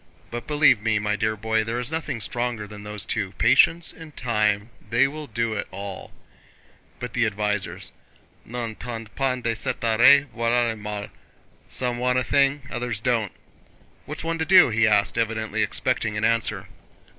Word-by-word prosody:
But 120 0 -6
believe 145 -7 +4
me, 110 -1 +1
my 105 0 0
dear 110 0 0
boy, 110 +1 0
there 115 +2 -2
is 125 +3 -4
nothing 155 -7 -3
stronger 120 -2 -2
than 105 0 -10
those 105 0 -5
two: 100 -4 -2
patience 165 +8 +4
and 160 -2 -13
time, 105 -2 0 0.2
they 120 +4 +4
will 150 +1 -7
do 115 -1 -1
it 100 - -3
all. 100 0 -7 0.9
But 125 - -6
the 115 -2 +2
advisers 105 -1 -3 0.5
n'entendent 115 -1 -6
pas 130 -2 0
de 115 0 0
cette 130 +2 -3
oreille, 120 +5 +6
voilà 115 +1 +2
le - - -5
mal. 105 -1 -5 0.3
* - - -33
Some 125 -1 -1
want 125 0 +1
a 130 - +2
thing—others 125 -3 0
don't. 115 -4 0 0.8
What's 150 +3 -4
one 165 0 -2
to 160 - 0
do?" 180 -3 +7
he 115 0 +3
asked, 100 -3 +2
evidently 110 -1 -1
expecting 110 0 -1
an 105 - 0
answer. 110 -4 0
115 Hz, 170 wpm, -24 LUFS, 105-125 Hz, 0.9 s, do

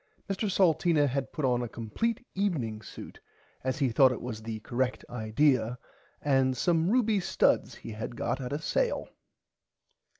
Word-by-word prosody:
Mr 200 +1 -1
Salteena 170 -4 +3
had 135 0 -2
put 150 - -2
on 125 -1 +2
a 120 - -3
compleat 225 - -2
evening 140 - -1
suit - - -10 0.4
as 130 0 -1
he 135 -4 +2
thought 130 +3 +5
it 125 - -3
was 115 -3 -6
the 110 0 -5
correct 125 +3 -2
idear 120 +1 +1 0.5
and 135 -2 +2
some 165 +3 +2
ruby 225 -3 +3
studs 180 - +2
he - - -9
had 110 +2 -6
got 130 +3 -2
at 125 - -5
a 145 - 0
sale. - - -1
130 Hz, 160 wpm, -29 LUFS, 120-175 Hz, 0.5 s, thought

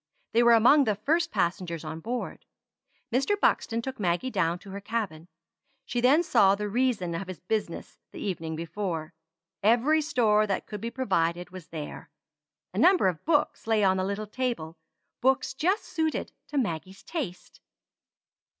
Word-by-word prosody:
They 230 - +4
were 235 -1 +7
among 265 +6 +6
the 215 -3 +1
first 325 +11 +1
passengers 170 - -1
on 160 - -6
board. 240 +7 -5 0.7
Mr. 275 +12 +1
Buxton 230 - +1
took 265 -1 -5
Maggie 180 +7 0
down 165 -4 +1
to 195 +2 -12
her 200 +1 -6
cabin. 200 -7 -3 0.6
She 245 -2 -2
then 280 +7 +5
saw 200 - +4
the 210 +1 -3
reason 220 -6 0
of 180 +3 -4
his 185 -2 -7
business 195 -2 -4
the - - -11
evening 165 -5 -3
before. 170 -1 -4 0.5
Every 245 +9 +4
store 225 -8 +2
that 195 - -1
could 210 -2 -7
be 230 - -3
provided 180 -9 -1
was 185 -2 -10
there. 155 -3 -7 0.6
A - - -2
number 365 - +5
of 170 -4 -6
books 300 -7 +1
lay 220 -2 +3
on 190 -1 +4
the 185 - 0
little 200 +2 -2
table 210 -8 -3 0.5
books 265 +1 +2
just 360 +10 +1
suited 320 -2 -2 0.2
to 295 - -4
Maggie's 190 - -3
taste. 210 - -6
210 Hz, 160 wpm, -27 LUFS, 180-255 Hz, 0.7 s, were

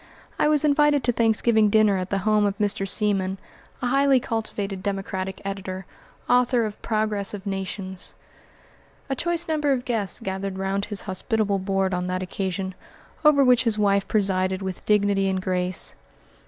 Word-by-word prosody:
I - - +4
was 300 0 +3
invited 295 -1 +3
to 245 - +3
Thanksgiving 225 -1 +3
dinner 215 -1 +4
at 185 0 -4
the 200 - 0
home 215 -1 +3
of 200 0 -3
Mr. 200 -1 0
Seaman, 195 -2 +1 0.5
a - - +1
highly 275 0 +4
cultivated 205 -4 -4
Democratic 190 -1 -3
editor, 190 -1 -5 0.4
author 245 -1 +3
of 210 -1 -7
"Progress 215 -2 -1
of 200 0 -10
Nations." 190 -1 -4 1.0
A - - +1
choice 345 +4 0
number 300 -3 +1
of 255 -2 0
guests 220 -5 -1
gathered 195 -2 -4
round 195 +1 -1
his 205 -2 -4
hospitable 205 +1 0
board 195 0 0
on 180 0 -1
that 185 0 -2
occasion, 190 0 -3 0.5
over 300 -2 +6
which 250 -1 +4
his 225 -2 +1
wife 200 -1 +2
presided 190 -2 +1
with 190 -1 -5
dignity 200 -2 +3
and 190 0 0
grace. 185 -1 -2
200 Hz, 160 wpm, -24 LUFS, 190-230 Hz, 1.0 s, over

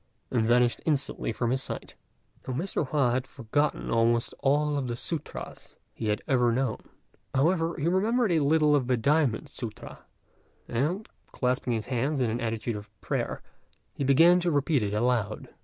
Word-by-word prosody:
and 115 -3 +1
vanished 120 0 +3
instantly 145 -6 -1
from 120 +1 -1
his 130 +1 0
sight. - - -6 0.5
Now 130 - -2
Mr. 165 -1 -2
Hua 135 -4 +2
had 130 +2 -1
forgotten 140 +4 -1
almost 115 +1 +2
all 145 +1 +2
the 120 -2 -3
sûtras 160 +6 -6 0.2
he 110 - -4
had 105 0 0
ever 125 -3 +3
known; 125 -1 0 0.6
however, 165 +4 +2
he 145 - 0
remembered 215 +5 +2
a 165 - +3
little 150 0 +4
of 130 -4 +1
the 125 -1 +2
diamond 140 +1 +2
sûtra, 120 -6 -8 0.7
and, 155 - -1 0.2
clasping 125 -1 0
his 110 -2 -2
hands 135 +3 -1
in 120 -3 +1
an 120 - -2
attitude 115 0 -2
of 105 0 -10
prayer, - - -3 0.5
he - - -3
began 165 +7 +6
to 175 0 0
repeat 145 -2 +2
it 105 0 -1
aloud. 110 -2 0
130 Hz, 165 wpm, -28 LUFS, 120-150 Hz, 0.7 s, began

